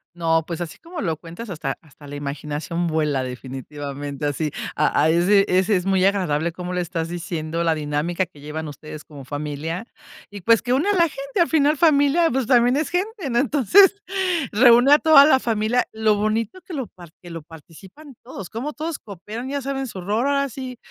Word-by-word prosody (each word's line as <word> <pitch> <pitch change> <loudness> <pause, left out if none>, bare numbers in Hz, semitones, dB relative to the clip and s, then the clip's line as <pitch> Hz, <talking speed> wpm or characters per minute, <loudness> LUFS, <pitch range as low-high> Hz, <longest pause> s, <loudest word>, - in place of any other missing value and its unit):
No, 165 -1 +1
pues, 170 0 -5
así 160 -4 -6
como 335 0 -8
lo 165 -6 -1
cuentas, 175 +8 -9
hasta 150 -6 -3
hasta 150 -1 -18
la 145 - -8
imaginación 150 +4 -4
vuela, 150 -5 0
definitivamente, 140 +3 -6
así. 150 +1 -2 0.2
A 150 - +2
ahí 160 +2 +3
sí, 200 +1 +5
ese 185 +3 +2
es 180 +1 -1
muy 190 -1 +3
agradable 170 -5 +1
como 180 +1 -6
lo 180 - -1
estás 170 -2 -3
diciendo, 170 -1 -3
la 165 -1 +2
dinámica 155 +4 -2
que 155 -3 -19
llevan 150 +2 -6
ustedes 150 +1 -9
como 140 -3 -12
familia 150 - -5 0.4
y, 200 -1 -9
pues, 230 +4 +4
que 245 - -3
une 295 +9 +1
a - - +3
la 370 - +3
gente, 275 +3 -5
al 335 - +2
final 300 -1 +3
familia, 305 +1 +4
pues, 260 -1 0
también 245 0 +4
es 305 - -1
gente, 375 - -2
¿no? 235 - +2
Entonces, 355 - +4 0.5
reúne 245 +4 +6
a 295 - +6
toda 310 -3 +7
la 290 -3 +5
familia. 225 +1 0
Lo 220 -1 +2
bonito 215 - -1
que 360 - -10
lo 265 -4 -3
par 175 -3 -15
que 175 -1 -11
lo 165 - -6
participan 180 - -15
todos, 195 -8 -9
como 270 +7 -4
todos 315 0 -4
cooperan, 215 +6 -8
ya 280 0 -2
saben 270 0 -3
su 195 - -8
rol. 195 +4 -3
Ahora 280 0 +1
sí, 255 0 -7
190 Hz, 200 wpm, -22 LUFS, 160-265 Hz, 0.5 s, toda